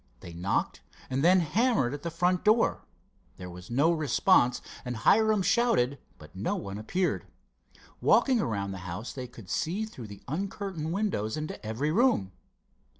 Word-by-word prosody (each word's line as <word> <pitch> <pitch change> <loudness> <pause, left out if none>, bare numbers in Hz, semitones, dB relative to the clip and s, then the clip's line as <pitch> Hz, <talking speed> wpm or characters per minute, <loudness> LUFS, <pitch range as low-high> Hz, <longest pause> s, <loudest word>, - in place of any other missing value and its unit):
They 85 - -9
knocked 90 +3 -1 0.3
and 135 +2 0
then 180 +2 +6
hammered 180 - +1
at 145 - -6
the 170 - -3
front 175 +2 +1
door. 215 +2 +2 0.5
There 90 -1 -8
was 90 +1 -11
no 140 +8 +3
response, 130 -5 +3 0.2
and 125 -1 -4
Hiram 215 - +4
shouted, 160 - +2 0.2
but 75 +3 -15
no 95 - -1
one 100 +1 -5
appeared. 180 +12 -1 0.7
Walking 255 -5 +4
around 100 -7 -2
the 95 - -6
house, 100 +8 -5
they 130 -2 -6
could 115 -5 -13
see 170 - -1
through 130 - -9
the 100 -1 -12
uncurtained 185 0 -4
windows 170 - -1
into 155 0 -5
every 115 +8 -1
room. 185 - +2
145 Hz, 155 wpm, -28 LUFS, -, 0.7 s, then